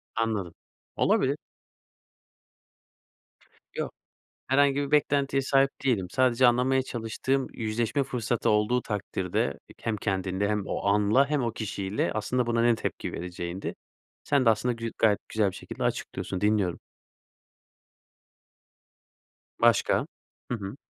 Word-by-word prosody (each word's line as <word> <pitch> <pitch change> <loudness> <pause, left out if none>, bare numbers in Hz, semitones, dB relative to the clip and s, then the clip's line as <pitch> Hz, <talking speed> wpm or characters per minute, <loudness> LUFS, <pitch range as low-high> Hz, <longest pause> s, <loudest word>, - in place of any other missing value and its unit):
Anladım. 110 -7 -1 0.4
Olabilir. - - +2 2.4
Yok, - - -3 0.6
herhangi 140 +1 +4
bir 145 0 -1
beklentiye 140 -2 +2
sahip 135 0 +3
değilim. 100 -9 +1
Sadece 130 +2 +4
anlamaya 125 +2 +3
çalıştığım 130 +3 -2
yüzleşme 115 +4 -1
fırsatı 120 -3 -1
olduğu 105 +4 +2
takdirde 90 -8 -2
ek - - -17
hem 115 -1 +1
kendinde 95 -1 -1
hem 105 -2 -1
o - - -3
anla 105 +7 +4
hem 150 -4 +1
o 115 - -1
kişiyle 100 -2 -2
aslında 115 +3 0
buna 115 0 +1
ne 120 0 +5
tepki 110 - -4
vereceğindi. 90 +1 -5 0.5
Sen 140 -2 +2
de 115 - +6
aslında 110 +3 +1
gü 115 -1 -4
gayet 105 -3 +4
güzel 105 -3 +1
bir - - -11
şekilde - - -6
açıklıyorsun, 95 - -3
dinliyorum. 105 -4 +1 2.8
Başka? - - +3 0.4
Hı 120 - 0
hı. 100 +2 -6
115 Hz, 120 wpm, -27 LUFS, 100-130 Hz, 2.8 s, de